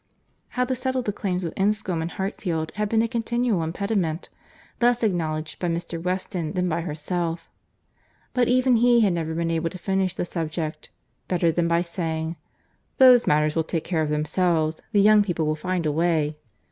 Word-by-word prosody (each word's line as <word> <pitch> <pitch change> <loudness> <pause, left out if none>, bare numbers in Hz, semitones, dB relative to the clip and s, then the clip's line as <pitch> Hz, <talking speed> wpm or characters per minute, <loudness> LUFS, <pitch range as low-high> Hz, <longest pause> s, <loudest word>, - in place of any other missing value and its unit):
How 250 - +3
to 260 - -1
settle 260 0 -1
the 205 - -2
claims 185 -2 -2
of 165 - -3
Enscombe 195 -4 0
and 165 - -3
Hartfield 175 -4 -3
had 210 0 -2
been 225 0 +3
a - - +1
continual 235 -3 0
impediment—less 200 +6 -2
acknowledged 160 -6 -1
by 175 - -1
Mr. 170 0 -3
Weston 180 -2 -2
than 180 -1 0
by 170 0 -1
herself—but 170 +8 -5
even 255 0 +4
he 240 0 +5
had 200 -4 +3
never 160 -1 -2
been 165 0 -1
able 165 0 0
to 185 - -9
finish 190 0 -1
the - - -2
subject 160 -2 -4 0.4
better 170 -2 +2
than 170 +1 0
by 170 +1 +2
saying—"Those 170 +9 +1
matters 150 0 +2
will 165 - +2
take 160 0 -3
care 170 -3 -1
of 155 - -1
themselves; 155 +1 0
the 205 -3 +4
young 210 +1 +6
people 175 -5 -1
will 155 0 0
find 180 +1 -2
a 150 - +2
way." 160 -1 +1
175 Hz, 170 wpm, -24 LUFS, 160-205 Hz, 0.4 s, young